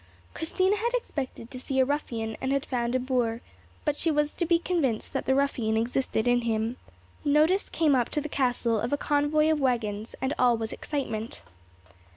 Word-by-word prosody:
Christina 375 +5 +1
had 475 +3 -1
expected 270 - -4
to 255 - -6
see 265 +1 -2
a 260 - +5
ruffian, 230 -6 -2
and 265 - -1
had 275 0 0
found 240 -1 -1
a - - +3
boor; 245 -3 0 0.4
but 295 -2 +1
she 330 - 0
was 295 -1 +1
to 340 - -2
be 340 0 +5
convinced 325 -10 -1
that - - -2
the 265 - +4
ruffian 245 -6 +1
existed 235 0 0
in 245 0 +4
him. 225 +1 -1 0.5
Notice 305 +6 +3
came 310 -3 +2
up 250 -2 +2
to 300 - -1
the 300 - -4
castle 245 -5 +1
of 235 - -2
a 285 - +2
convoy 295 +2 +2
of 310 - +1
waggons, 230 -5 -1
and 265 +2 -1
all 245 -2 +4
was 225 0 -3
excitement. 230 -6 -4
265 Hz, 190 wpm, -27 LUFS, 235-295 Hz, 0.5 s, a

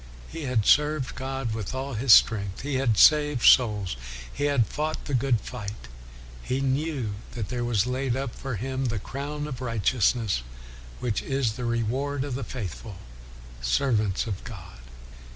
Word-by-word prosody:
He 165 -3 -6
had 120 -5 +1
served 150 -2 +3
God 130 -2 -3
with 110 +2 -4
all 135 +1 -4
his 115 +3 +2
strength; 100 -4 +5
he 145 +1 -3
had 115 -6 +2
saved 150 -3 +5
souls; 105 - +5 0.4
he 145 - -1
had 140 -5 +3
fought 155 +7 -3
the 145 - -4
good 125 -2 +2
fight; 105 - -7 0.5
he 130 - -2
knew 135 -4 -1 0.2
that 110 -4 -4
there 125 -1 -2
was 115 -3 +1
laid 130 0 -1
up 135 -2 -3
for 135 -3 -5
him 130 +5 -3
the 115 -3 -1
crown 145 +7 -5
of 130 -3 -6
righteousness 115 - +1 0.6
which 120 -4 -1
is 135 -5 0
the 125 +1 -5
reward 130 +5 -1
of 140 -2 -4
the 130 +1 -3
faithful 110 - -6 0.7
servants 105 - +1
of 105 -5 -5
God. - - -10
125 Hz, 160 wpm, -26 LUFS, 110-135 Hz, 0.7 s, strength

